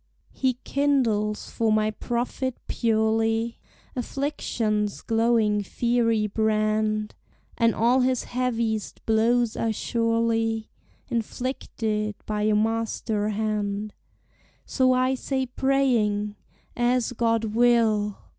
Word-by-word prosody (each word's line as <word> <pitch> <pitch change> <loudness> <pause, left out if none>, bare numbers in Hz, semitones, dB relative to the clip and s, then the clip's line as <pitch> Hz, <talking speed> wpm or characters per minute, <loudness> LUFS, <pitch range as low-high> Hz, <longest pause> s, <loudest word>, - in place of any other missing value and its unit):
He 260 -2 0
kindles 235 -7 0
for 225 -1 +1
my 215 0 +2
profit 240 +3 -3
purely 225 0 +1 0.4
Affliction's 230 -6 -2
glowing 225 -2 +2
fiery 230 +1 +1
brand, 215 0 0 0.4
And 230 -1 +2
all 240 +3 +3
his 255 -1 +1
heaviest 230 -4 -2
blows 230 +1 +2
are 225 - 0
surely 230 0 0 0.4
Inflicted 220 -3 -2
by 210 -1 -2
a 210 0 +2
Master 220 -1 0
hand: 210 -1 -2 0.7
So 260 -1 +2
I 255 +1 +2
say, 265 0 -2
praying, 240 -6 +1 0.4
As 245 0 +1
God 225 -2 0
will! 225 -3 +3
225 Hz, 95 wpm, -25 LUFS, 215-245 Hz, 0.7 s, all